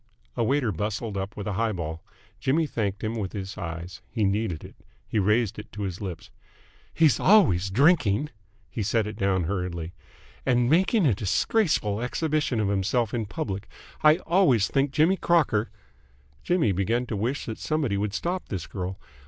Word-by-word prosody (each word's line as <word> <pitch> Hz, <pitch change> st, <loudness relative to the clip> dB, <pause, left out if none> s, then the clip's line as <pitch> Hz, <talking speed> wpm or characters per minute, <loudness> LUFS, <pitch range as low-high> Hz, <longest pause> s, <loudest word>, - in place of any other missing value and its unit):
A 120 Hz, -, +1 dB
waiter 130 Hz, -1 st, +1 dB
bustled 105 Hz, +3 st, -3 dB
up 95 Hz, +2 st, -4 dB
with 100 Hz, -, -5 dB
a 105 Hz, -, -2 dB
high 110 Hz, +3 st, 0 dB
ball. 80 Hz, -2 st, -5 dB, 0.4 s
Jimmy 155 Hz, +5 st, +2 dB
thanked 105 Hz, -7 st, -3 dB
him 110 Hz, +1 st, -1 dB
with 105 Hz, -5 st, -4 dB
his 95 Hz, -1 st, -5 dB
eyes. 85 Hz, -1 st, -6 dB
He 115 Hz, -3 st, -1 dB
needed 100 Hz, -4 st, 0 dB
it. -, -, -11 dB, 0.3 s
He 110 Hz, -, 0 dB
raised 105 Hz, +2 st, +1 dB
it -, -, -10 dB
to 105 Hz, 0 st, -4 dB
his 95 Hz, -1 st, -4 dB
lips. 90 Hz, -5 st, -6 dB, 0.6 s
"He's 160 Hz, -3 st, +3 dB
always 145 Hz, -, +5 dB
drinking 140 Hz, -, +3 dB, 0.2 s
" 100 Hz, -, -36 dB
He 115 Hz, -, -3 dB
set 110 Hz, +2 st, +1 dB
it 105 Hz, 0 st, -5 dB
down 95 Hz, -3 st, +1 dB
hurriedly. 90 Hz, -2 st, -3 dB, 0.3 s
" -, -, -26 dB
and 120 Hz, -1 st, +2 dB
making 185 Hz, -, +3 dB
a 130 Hz, -, +4 dB
disgraceful 105 Hz, -, +1 dB
exhibition 150 Hz, -1 st, 0 dB
of 105 Hz, -2 st, +1 dB
himself 100 Hz, +4 st, 0 dB
in 115 Hz, -3 st, -2 dB
public! 100 Hz, -7 st, -4 dB, 0.3 s
I 155 Hz, 0 st, +7 dB
always 165 Hz, -, +3 dB
think 140 Hz, +1 st, +1 dB
Jimmy 160 Hz, +7 st, +3 dB
Crocker 140 Hz, -, +2 dB, 0.4 s
" 65 Hz, +1 st, -33 dB
Jimmy 175 Hz, -, +2 dB
began 110 Hz, +7 st, 0 dB
to 115 Hz, -, -4 dB
wish 120 Hz, +8 st, -2 dB
that 110 Hz, -, -6 dB
somebody 150 Hz, -9 st, 0 dB
would 100 Hz, 0 st, -2 dB
stop 180 Hz, +2 st, -3 dB
this 95 Hz, -5 st, -4 dB
girl. 95 Hz, 0 st, -5 dB
105 Hz, 180 wpm, -26 LUFS, 95-135 Hz, 0.6 s, I